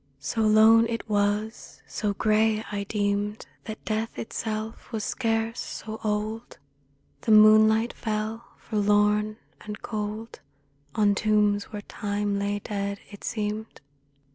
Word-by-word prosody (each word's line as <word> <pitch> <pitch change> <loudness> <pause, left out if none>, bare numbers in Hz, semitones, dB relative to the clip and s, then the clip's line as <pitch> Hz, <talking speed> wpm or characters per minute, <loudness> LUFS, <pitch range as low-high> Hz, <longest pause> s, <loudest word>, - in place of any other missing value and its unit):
So 185 +11 -2
lone 220 +1 +6
it 230 -1 -4
was, 210 +1 -1
so 205 -2 -2
grey, 215 0 +2
I 200 -1 -3
deemed 205 0 -1 0.2
That 220 -1 -8
death 220 +1 -2
itself 220 0 -5
was 220 -3 -3
scarce 225 0 -1
so 220 0 -6
old; 215 +2 -3 0.6
The 225 - 0
moonlight 215 +2 +6
fell 220 +1 -3
forlorn 210 0 +1 0.3
and 210 0 -7
cold 215 +1 -5 0.6
On 205 -1 +4
tombs 210 -1 +2
where 205 -1 -8
Time 205 0 -2
lay 200 +1 -1
dead, 200 -1 -3
it 205 - -12
seemed. 215 0 -3
215 Hz, 120 wpm, -26 LUFS, 205-220 Hz, 0.6 s, lone